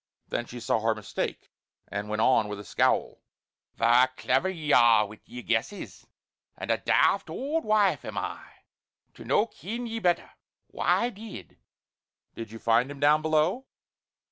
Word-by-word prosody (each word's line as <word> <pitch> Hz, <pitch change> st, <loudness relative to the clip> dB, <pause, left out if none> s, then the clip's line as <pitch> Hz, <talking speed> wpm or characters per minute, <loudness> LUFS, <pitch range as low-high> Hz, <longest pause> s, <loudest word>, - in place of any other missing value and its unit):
Then 120 Hz, -, -3 dB
she 120 Hz, -, -8 dB
saw 115 Hz, -, 0 dB
her 110 Hz, 0 st, +1 dB
mistake 105 Hz, -2 st, -5 dB, 0.4 s
and 105 Hz, +1 st, -5 dB
went 105 Hz, +1 st, 0 dB
on 115 Hz, -5 st, +3 dB
with 105 Hz, -1 st, -6 dB
a -, -, -8 dB
scowl: -, -, 0 dB, 0.5 s
"Verra 120 Hz, +3 st, +4 dB
clever 135 Hz, +9 st, +1 dB
ye 155 Hz, -5 st, -2 dB
are 115 Hz, -3 st, +6 dB
wi' 105 Hz, +1 st, -12 dB
yer 125 Hz, 0 st, -9 dB
guesses; 120 Hz, -, -3 dB, 0.5 s
and -, -, -3 dB
a -, -, +1 dB
daft -, -, +2 dB
aud 300 Hz, +5 st, -2 dB
wife 215 Hz, -2 st, +2 dB
am -, -, -7 dB
I -, -, -4 dB, 0.7 s
to -, -, -12 dB
no 210 Hz, -, +2 dB
ken 235 Hz, +2 st, -6 dB
ye 225 Hz, -1 st, -4 dB
better? 175 Hz, -4 st, 0 dB, 0.4 s
Why 240 Hz, +1 st, +1 dB
did 200 Hz, -, -11 dB, 0.4 s
" -, -, -61 dB
"Did 115 Hz, -2 st, -7 dB
you 115 Hz, -, -8 dB
find 115 Hz, +3 st, +2 dB
him 145 Hz, -1 st, -8 dB
down 150 Hz, +2 st, +4 dB
below?" 160 Hz, +10 st, +1 dB
130 Hz, 165 wpm, -27 LUFS, -, 0.7 s, are